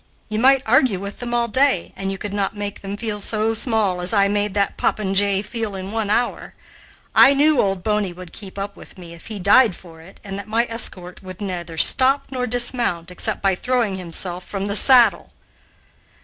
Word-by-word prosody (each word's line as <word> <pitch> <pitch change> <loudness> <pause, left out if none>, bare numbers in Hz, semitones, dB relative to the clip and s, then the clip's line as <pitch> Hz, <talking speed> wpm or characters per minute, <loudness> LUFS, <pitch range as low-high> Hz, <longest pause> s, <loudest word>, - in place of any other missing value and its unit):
You 215 0 -2
might 265 +2 +4
argue 235 -4 +2
with 200 +1 -8
them 245 -1 -5
all 240 0 0
day, 260 -5 0
and 195 0 -4
you 195 - -5
could 205 0 -6
not 205 +1 -2
make 205 0 -6
them 200 +1 -6
feel 210 -2 -4
so 220 +2 0
small 220 -6 0
as 180 +5 -2
I 200 -2 +3
made 205 0 -1
that 200 -1 0
popinjay 200 -1 0
feel 220 -3 -5
in 190 +1 -7
one 220 -2 -3
hour. 240 +3 -2 0.6
I 275 +1 +6
knew 295 +1 +3
'Old 195 -2 -2
Boney' 210 -3 -1
would 180 0 -12
keep 200 -2 -11
up 200 0 -5
with - - -15
me, 170 -2 -11
if 170 - -14
he 220 -2 -6
died 200 +2 +4
for 165 -3 -15
it, 180 +4 -17
and 195 -1 -7
that 200 - -9
my 230 +2 +1
escort 185 -6 -2
could 185 -1 -10
neither 175 -5 -6
stop 265 - +4
nor 250 -1 -3
dismount, 235 -8 -1
except 180 - -2
by 195 -1 +2
throwing 230 -1 -1
himself 180 +1 -2
from 195 +1 -5
the 200 0 -2
saddle." 245 +1 +5
205 Hz, 205 wpm, -20 LUFS, 190-230 Hz, 0.6 s, I